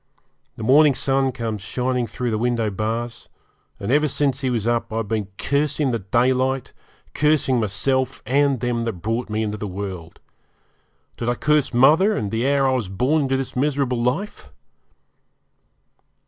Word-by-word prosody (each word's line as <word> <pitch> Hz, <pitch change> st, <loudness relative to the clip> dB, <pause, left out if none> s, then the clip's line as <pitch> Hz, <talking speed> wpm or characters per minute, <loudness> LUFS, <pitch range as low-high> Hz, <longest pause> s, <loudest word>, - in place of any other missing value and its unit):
The 115 Hz, -, -7 dB
morning 140 Hz, +4 st, +5 dB
sun 135 Hz, 0 st, +1 dB
comes 115 Hz, -4 st, -4 dB
shining 125 Hz, +3 st, -1 dB
through 125 Hz, 0 st, -3 dB
the 110 Hz, -, -1 dB
window 115 Hz, -2 st, 0 dB
bars; 115 Hz, +4 st, -4 dB, 0.5 s
and 100 Hz, -, -3 dB
ever 150 Hz, +2 st, +3 dB
since 140 Hz, -1 st, 0 dB
he 130 Hz, -, 0 dB
was 115 Hz, -4 st, -1 dB
up 120 Hz, 0 st, 0 dB
have 110 Hz, -, -4 dB
I -, -, +1 dB
been 105 Hz, -1 st, -2 dB
cursing 145 Hz, -1 st, 0 dB
the 115 Hz, -, -1 dB
daylight, 130 Hz, +5 st, 0 dB, 0.4 s
cursing 150 Hz, -4 st, +2 dB
myself, 130 Hz, +6 st, -1 dB
and 135 Hz, 0 st, +2 dB
them 120 Hz, -1 st, -1 dB
that 115 Hz, -, -2 dB
brought 110 Hz, +7 st, -3 dB
me 110 Hz, +1 st, -1 dB
into 105 Hz, 0 st, -3 dB
the 105 Hz, -, -5 dB
world. 95 Hz, -3 st, -7 dB, 1.0 s
Did 120 Hz, -, -2 dB
I 120 Hz, -, +1 dB
curse 150 Hz, +2 st, +1 dB
mother, 155 Hz, -, +4 dB
and 100 Hz, -, -3 dB
the 115 Hz, +4 st, 0 dB
hour 140 Hz, -1 st, +3 dB
I 130 Hz, -, +2 dB
was 120 Hz, -7 st, -2 dB
born 130 Hz, +11 st, +1 dB
into 135 Hz, -1 st, 0 dB
this 135 Hz, -1 st, -4 dB
miserable 135 Hz, -2 st, 0 dB
life? 130 Hz, -, -3 dB
125 Hz, 165 wpm, -22 LUFS, 110-135 Hz, 1.0 s, morning